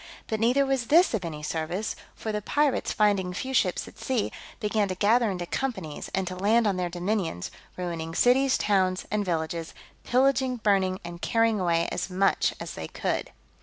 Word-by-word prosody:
But 220 - -2
neither 250 +5 +3
was 265 -3 0
this 335 +4 +5
of 215 -5 -1
any 155 -3 -5
service; 165 +7 -2 0.2
for 220 - -4
the 210 0 -2
pirates, 290 +5 +1
finding 195 -4 +2
few 265 +6 -4
ships - - +1
at - - -14
sea, 255 -6 -1 0.3
began 210 -2 +1
to 185 - -3
gather 220 +4 +3
into 180 -3 -3
companies, 190 - -4
and 190 0 0
to 185 0 -5
land 215 +5 +3
on 200 -2 +2
their 180 -1 -1
dominions, 175 - -2 0.3
ruining 165 -2 -4
cities, 260 +4 +4
towns, 185 -3 +1
and 210 0 +1
villages; 165 -2 -3 0.3
pillaging, 260 0 +2
burning, 195 -4 +1
and 170 0 -8
carrying 225 -2 +2
away 170 -2 +1
as 180 - -2
much 190 +1 +2
as - - -6
they - - -6
could. - - -2
200 Hz, 180 wpm, -27 LUFS, 180-235 Hz, 0.3 s, this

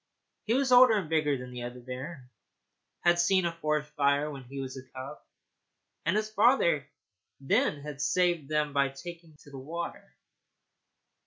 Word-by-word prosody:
He 225 - +1
was 265 -1 +1
older 245 -3 +8
and 190 -6 -2
bigger 150 -3 +1
than 125 0 -8
the 125 -1 -7
other 120 +1 -6
bear, 130 +3 -8 0.8
and 175 - +7
had 175 - -1
seen 185 +1 +3
a 170 - +1
forest 150 -2 -2
fire 145 0 +1
when 135 -2 -8
he 135 +3 -8
was 130 -1 -5
a 130 - -7
cub, 130 +3 -9 0.9
and 175 - +2
his 215 0 -2
father 205 - +3 0.5
then 140 +1 +1
had 145 -2 -6
saved 165 0 +1
them 150 -1 0
by 140 -1 +2
taking 165 +3 -11
to 145 - -15
the 135 - -8
water. 170 +6 -6
150 Hz, 170 wpm, -29 LUFS, 135-175 Hz, 0.9 s, older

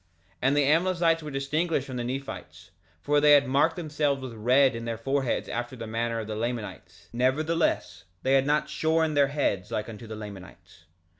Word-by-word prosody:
3:4 - - -33
And 135 +3 +2
the 145 - +4
Amlicites 165 +2 +2
were 150 - -6
distinguished 140 +2 -1
from 130 -2 -6
the 120 - -2
Nephites, 135 +3 -7 0.3
for 145 0 +2
they 150 0 +7
had 140 -1 +6
marked 140 +5 +2
themselves 150 -4 -1
with 130 -3 -7
red 125 +4 +3
in 115 0 -5
their 115 -1 -3
foreheads 135 +2 -1
after 120 +2 -4
the 115 -2 -7
manner 115 +1 -2
of 110 - -4
the 110 0 -5
Lamanites; 115 -1 -5
nevertheless 130 - 0 0.2
they 135 - +2
had 135 0 +3
not 150 +1 +1
shorn 160 +1 +1
their 145 -1 +4
heads 135 -10 -1
like 105 - -3
unto 115 0 -9
the 110 - -6
Lamanites. 95 -4 -11
135 Hz, 195 wpm, -27 LUFS, 115-150 Hz, 0.3 s, they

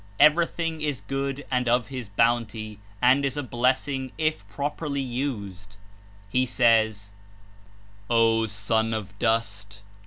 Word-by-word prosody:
Fver>'thing 165 0 +3
is 145 -7 -2
good 135 +5 -3
and 125 -2 +1
of 120 +1 +2
his 125 -5 -6
Bounty 110 -1 0 0.2
and 130 +3 +5
is 140 0 -1
a 145 - -1
blessing 130 +2 0
if 155 -10 -1
properlv 140 +3 -3
used. 100 -7 -5 0.5
He 125 +5 +1
says: 110 -4 +2 1.0
''O 115 -1 +3
Son 110 +2 0
of 100 -2 -7
Dust! 105 -2 -1
120 Hz, 120 wpm, -25 LUFS, 105-135 Hz, 1.0 s, and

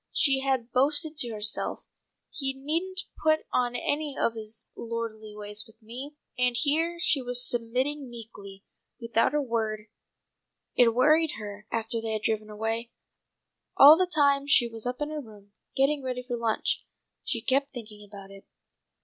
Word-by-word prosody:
She 275 -2 +4
had 265 -3 -1
boasted 295 +4 +3
to 250 -6 +3
herself, 210 -1 -1 0.5
"He 270 -3 -1
needn't 335 +8 -1 0.2
put 310 0 +4
on 245 -1 +1
any 290 +3 -2
of 230 - +2
his 220 -1 -4
lordly 225 -2 -5
ways 210 0 -6
with 220 0 -21
me!" 250 +6 -8 0.2
and 250 -1 +2
here 320 +7 +1
she 320 -4 +2
was 245 0 0
submitting 255 +4 -1
meekly, 205 -4 -10 0.4
without 230 +3 +1
a 295 - +2
word. 220 -3 -2 0.9
It 230 -2 +5
worried 310 +4 +4
her 210 0 -8
after 230 0 -2
they 225 -1 -2
had 215 0 -3
driven 215 -1 -1
away. 225 +2 -3 0.9
All 290 +3 +11
the 370 +2 +1
time 280 -2 +3
she 245 -4 +5
was 225 0 -5
up 250 +3 -4
in 295 +1 -2
her 305 -1 -4
room, 210 -4 -15 0.2
getting 280 +2 +2
ready 250 -1 -4
for 245 -1 -3
lunch, 230 -2 -1 0.4
she - - -2
kept 275 +1 +1
thinking 215 -4 -9
about 200 -1 -12
it. 195 0 -14
240 Hz, 160 wpm, -27 LUFS, 220-280 Hz, 0.9 s, All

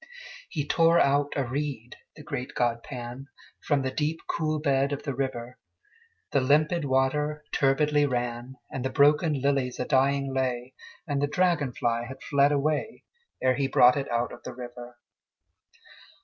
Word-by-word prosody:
He 145 -2 -3
tore 165 +2 +4
out 145 0 +2
a 140 - +1
reed, 130 -2 -4 0.2
the 150 - -12
great 125 -2 -5
god 120 -1 0
Pan, 125 +1 -8 0.3
From 145 -3 +1
the 130 - -1
deep 155 +2 -1
cool 155 -1 -1
bed 140 -2 +1
of 145 - -4
the 140 - -3
river: 125 -2 -4 0.7
The 140 - +2
limpid 150 +4 +2
water 150 +3 0
turbidly 145 +2 +3
ran, 120 0 -3 0.2
And 130 - -4
the 130 - -1
broken 150 +1 +3
lilies 135 -2 0
a 125 - -1
dying 135 0 +1
lay, 130 -1 -2 0.3
And 145 -3 -1
the 145 - +2
dragon 165 -3 +1
fly 120 0 -1
had 130 +1 -10
fled 140 0 +3
away, 150 +9 -1 0.4
Ere 130 0 +4
he 140 - +1
brought 125 -1 +6
it 140 -1 -3
out 120 +1 -1
of - - -11
the 125 - -8
river. 120 0 -9
135 Hz, 165 wpm, -27 LUFS, 125-150 Hz, 0.7 s, brought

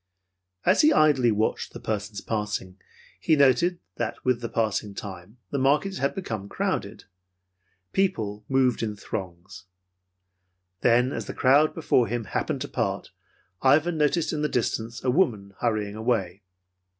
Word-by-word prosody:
As - - +5
he 305 0 +6
idly 145 - +4
watched 110 +1 -1
the - - -7
persons 105 -1 -4
passing, 105 -4 -3 0.4
he 160 - +3
noted 150 +6 +4 0.2
that - - -4
with 125 -2 +1
the 115 - -4
passing 105 -2 -1
time, 95 +3 -8
the 140 - -1
market 150 +9 +2
had 140 - 0
become 110 - -5
crowded. - - -3 0.9
People 110 - 0
moved 130 -2 +2
in 110 -2 -2
throngs. 95 -2 -7 1.2
And 120 - +4
then, 125 +3 +3
as - - -4
the - - -6
crowd 140 +4 +4
before 130 -7 +2
him 120 +2 -2
happened 100 - -2
to - - -3
part, - - -2 0.5
Ivan 150 +6 +4
noticed 150 +3 +1
in 150 - -2
the 150 - 0
distance 115 -1 -2
a 130 - +2
woman 110 - +1
hurrying 105 -3 -1
away. 110 -5 -1
115 Hz, 150 wpm, -26 LUFS, 105-140 Hz, 1.2 s, he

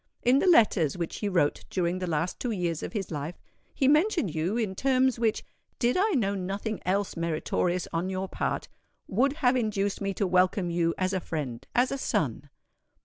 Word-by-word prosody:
In 255 +3 +5
the 380 - +1
letters 205 - +4
which 170 -2 -3
he 205 - -2
wrote 170 -6 +1
during 180 0 -1
the 185 - -3
last 165 +2 -1
two 250 - -2
years 175 -7 -1
of - - -5
his 200 -5 -3
life, 150 +3 -5 0.3
he 270 - +1
mentioned 305 - +3
you 170 +8 -1
in 215 -5 -1
terms 260 +2 +2
which, 225 -2 0 0.3
did 240 0 +1
I 400 +3 +2
know 205 -8 +1
nothing 200 +3 -3
else 195 +1 0
meritorious 170 +2 -1
on 170 +3 -1
your 190 0 -2
part, - - -2 0.4
would 265 +8 +2
have 250 +1 +5
induced 205 -5 -1
me 195 -1 -2
to 200 - 0
welcome 185 0 +2
you 170 -1 +1
as 185 +1 0
a 190 - +1
friend—as 155 - -2
a 275 - -2
son. 145 - -1
190 Hz, 190 wpm, -28 LUFS, 170-235 Hz, 0.4 s, In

